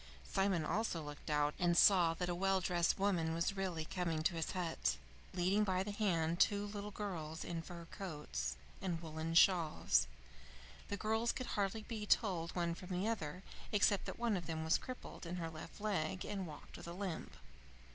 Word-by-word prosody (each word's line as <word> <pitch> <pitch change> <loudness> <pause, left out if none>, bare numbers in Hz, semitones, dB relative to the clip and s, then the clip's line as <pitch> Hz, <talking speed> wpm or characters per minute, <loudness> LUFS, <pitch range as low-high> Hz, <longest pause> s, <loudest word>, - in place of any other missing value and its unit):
Simon 195 -5 +2
also 190 -4 0
looked 150 +1 -8
out, 150 0 +2
and 175 -1 +3
saw 175 -4 +6
that 180 +2 -2
a 175 - 0
well 195 +2 +2
dressed 175 -2 +2
woman 175 -5 +1
was 170 +4 0
really 180 -5 -2
coming 165 -3 -1
to 175 - +3
his 165 -1 -2
hut, 165 - 0 0.3
leading 185 +4 +2
by 190 -2 +1
the 205 - -4
hand 175 -5 +1
two 205 -1 +4
little 205 0 -5
girls 170 -7 -4
in 170 -1 -3
fur 170 0 -8
coats 110 - -3 0.3
and 175 -3 -1
woolen 160 +1 -3
shawls. 160 - +5 0.8
The 200 - -2
girls 220 +2 +1
could 255 - -4
hardly 205 +2 0
be 215 -2 -5
told 175 -8 +2
one 170 -1 +1
from 180 +2 -9
the 185 +3 0
other, 180 -5 -2 0.3
except 200 -2 +3
that - - -5
one 235 -3 +1
of 175 -4 -3
them 160 -1 -2
was 160 - +3
crippled 255 -8 -7
in 175 - -3
her 165 -2 -3
left 155 +5 -9
leg 190 -4 -1
and 195 -3 -3
walked 150 -2 -10
with - - -9
a 170 - -5
limp. 185 -3 -4
180 Hz, 185 wpm, -37 LUFS, 165-200 Hz, 0.8 s, saw